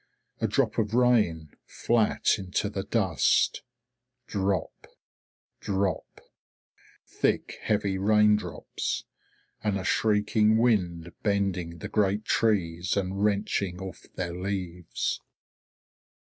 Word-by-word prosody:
A -, -, +1 dB
drop -, -, +1 dB
of 110 Hz, 0 st, 0 dB
rain, 105 Hz, -, +2 dB, 0.2 s
flat 115 Hz, -1 st, +1 dB
into 95 Hz, +2 st, -2 dB
the 100 Hz, -, -3 dB
dust. 95 Hz, -5 st, +2 dB, 0.6 s
Drop! 100 Hz, -4 st, -2 dB, 0.7 s
Drop! 95 Hz, -4 st, -2 dB, 0.8 s
Thick -, -, -1 dB
heavy 100 Hz, -3 st, 0 dB
raindrops, 105 Hz, +1 st, +1 dB, 0.6 s
and 105 Hz, -2 st, +1 dB
a 95 Hz, -, -4 dB
shrieking 105 Hz, +1 st, +2 dB
wind 90 Hz, -8 st, +1 dB
bending 95 Hz, -5 st, -1 dB
the -, -, -6 dB
great 105 Hz, 0 st, +1 dB
trees 90 Hz, -5 st, +1 dB
and 100 Hz, +1 st, -1 dB
wrenching 100 Hz, -3 st, 0 dB
off 95 Hz, -2 st, -8 dB
their 85 Hz, -2 st, -3 dB
leaves. 90 Hz, -2 st, -3 dB
100 Hz, 95 wpm, -27 LUFS, 90-105 Hz, 0.8 s, rain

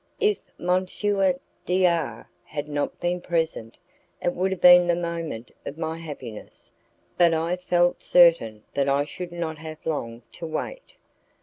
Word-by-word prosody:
If 425 Hz, -1 st, +2 dB, 0.2 s
M. 180 Hz, +1 st, +1 dB, 0.8 s
D 185 Hz, +1 st, +2 dB
R 170 Hz, -2 st, 0 dB, 0.2 s
had 145 Hz, 0 st, -5 dB
not 145 Hz, -1 st, -2 dB
been 175 Hz, 0 st, -1 dB
present, 160 Hz, -10 st, -2 dB, 0.4 s
it 175 Hz, -, 0 dB
would 185 Hz, +2 st, 0 dB
have 190 Hz, -1 st, -3 dB
been 180 Hz, 0 st, +8 dB
the 175 Hz, -, +3 dB
moment 170 Hz, -8 st, -4 dB
of 145 Hz, -, -7 dB
my 160 Hz, 0 st, -3 dB
happiness, 140 Hz, -9 st, -8 dB, 0.5 s
but 170 Hz, -2 st, +5 dB
I 165 Hz, +2 st, 0 dB
felt 175 Hz, -1 st, +1 dB
certain 165 Hz, -12 st, +4 dB
that 140 Hz, 0 st, +1 dB
I 140 Hz, +1 st, +2 dB
should 175 Hz, +3 st, -7 dB
not 165 Hz, -3 st, -4 dB
have 155 Hz, -1 st, -9 dB
long 120 Hz, -7 st, -3 dB
to 170 Hz, -, -7 dB
wait. -, -, -5 dB
165 Hz, 150 wpm, -25 LUFS, 150-175 Hz, 0.8 s, been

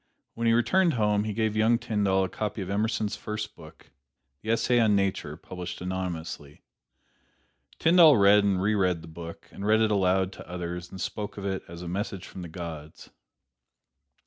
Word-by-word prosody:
When 115 Hz, 0 st, -1 dB
he 115 Hz, -, +5 dB
returned 170 Hz, +9 st, +3 dB
home 105 Hz, -2 st, +2 dB
he 110 Hz, -, -2 dB
gave 110 Hz, 0 st, 0 dB
young 110 Hz, +2 st, +4 dB
Tyndall 100 Hz, -4 st, +1 dB
a -, -, 0 dB
copy 105 Hz, +1 st, -4 dB
of 95 Hz, -, -6 dB
Emerson's 105 Hz, 0 st, 0 dB
first 105 Hz, 0 st, -5 dB
book, 80 Hz, -1 st, -15 dB, 0.5 s
the 110 Hz, -, -7 dB
"Essay 120 Hz, +2 st, +3 dB
on 110 Hz, -3 st, +4 dB
Nature," 95 Hz, -6 st, -1 dB
published 90 Hz, 0 st, -7 dB
anonymously. 85 Hz, -5 st, -5 dB, 1.1 s
Tyndall 165 Hz, -4 st, +7 dB
read 100 Hz, +1 st, +6 dB
and 100 Hz, -2 st, +2 dB
re 100 Hz, +3 st, +1 dB
read 90 Hz, -5 st, +1 dB
the -, -, -10 dB
book, 85 Hz, +1 st, -9 dB
and 100 Hz, -, -8 dB
read 110 Hz, +2 st, +4 dB
it 110 Hz, -1 st, +2 dB
aloud 95 Hz, -1 st, +2 dB
to -, -, -12 dB
others 90 Hz, 0 st, -5 dB
and 95 Hz, -, -9 dB
spoke 105 Hz, +3 st, -4 dB
of 100 Hz, -, -5 dB
it 95 Hz, -1 st, -2 dB
as 85 Hz, +1 st, -9 dB
a -, -, -6 dB
"message 95 Hz, +1 st, -4 dB
from 95 Hz, -, -9 dB
the 85 Hz, -, -7 dB
gods." 80 Hz, -3 st, -8 dB
100 Hz, 180 wpm, -27 LUFS, 90-110 Hz, 1.1 s, Tyndall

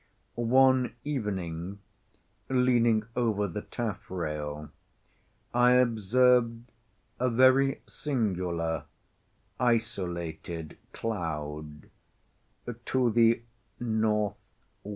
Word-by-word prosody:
One 130 Hz, +3 st, +3 dB
evening, 95 Hz, -, -3 dB, 0.7 s
leaning 120 Hz, -4 st, +3 dB
over 110 Hz, -4 st, +1 dB
the 100 Hz, +3 st, -5 dB
taffrail, 75 Hz, -10 st, -4 dB, 0.8 s
I 125 Hz, +1 st, +5 dB
observed 120 Hz, 0 st, +3 dB, 0.5 s
a 125 Hz, +1 st, +2 dB
very 130 Hz, +3 st, +4 dB
singular, 90 Hz, -, -2 dB, 0.7 s
isolated 85 Hz, -9 st, -2 dB
cloud, 75 Hz, -7 st, -5 dB, 0.9 s
to 125 Hz, -3 st, +2 dB
the 115 Hz, +1 st, +4 dB, 0.4 s
N.W. 110 Hz, -3 st, +1 dB
110 Hz, 65 wpm, -29 LUFS, 85-125 Hz, 0.9 s, I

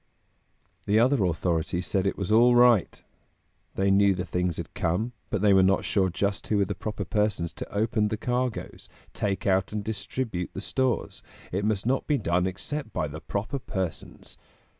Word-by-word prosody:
The 105 Hz, -, +3 dB
other 120 Hz, -1 st, +4 dB
authorities 85 Hz, +1 st, -1 dB
said 95 Hz, +3 st, 0 dB
it -, -, -1 dB
was 100 Hz, 0 st, -3 dB
"all 120 Hz, +3 st, +6 dB
right!" 120 Hz, -5 st, +4 dB, 0.7 s
They 95 Hz, 0 st, +2 dB
knew 100 Hz, 0 st, +4 dB
the 90 Hz, 0 st, -3 dB
things 90 Hz, -2 st, -1 dB
had -, -, -6 dB
come, 95 Hz, +9 st, -1 dB, 0.2 s
but 105 Hz, -1 st, -1 dB
they 100 Hz, -1 st, +6 dB
were 95 Hz, -, +6 dB
not 95 Hz, +1 st, +3 dB
sure 95 Hz, -3 st, +2 dB
just 100 Hz, +3 st, -2 dB
who 105 Hz, -, +1 dB
were 100 Hz, -, +3 dB
the 100 Hz, -, -3 dB
proper 100 Hz, +1 st, -5 dB
persons 105 Hz, -5 st, 0 dB
to -, -, -8 dB
open 105 Hz, +1 st, +1 dB
the 110 Hz, +1 st, -2 dB
cargoes, 125 Hz, +1 st, -3 dB, 0.2 s
take 100 Hz, -2 st, -2 dB
out 95 Hz, -1 st, +2 dB
and 105 Hz, -1 st, -3 dB
distribute 110 Hz, -2 st, -3 dB
the -, -, -5 dB
stores; 130 Hz, -4 st, -1 dB, 0.3 s
it 100 Hz, +3 st, -1 dB
must 105 Hz, -2 st, 0 dB
not 130 Hz, +2 st, 0 dB
be 150 Hz, -, +2 dB
done 90 Hz, -4 st, +1 dB
except 110 Hz, +7 st, -5 dB
by 80 Hz, -, -1 dB
the 80 Hz, +2 st, -8 dB
proper 105 Hz, -, -3 dB
persons. 95 Hz, -, -5 dB
100 Hz, 180 wpm, -27 LUFS, 95-110 Hz, 0.7 s, all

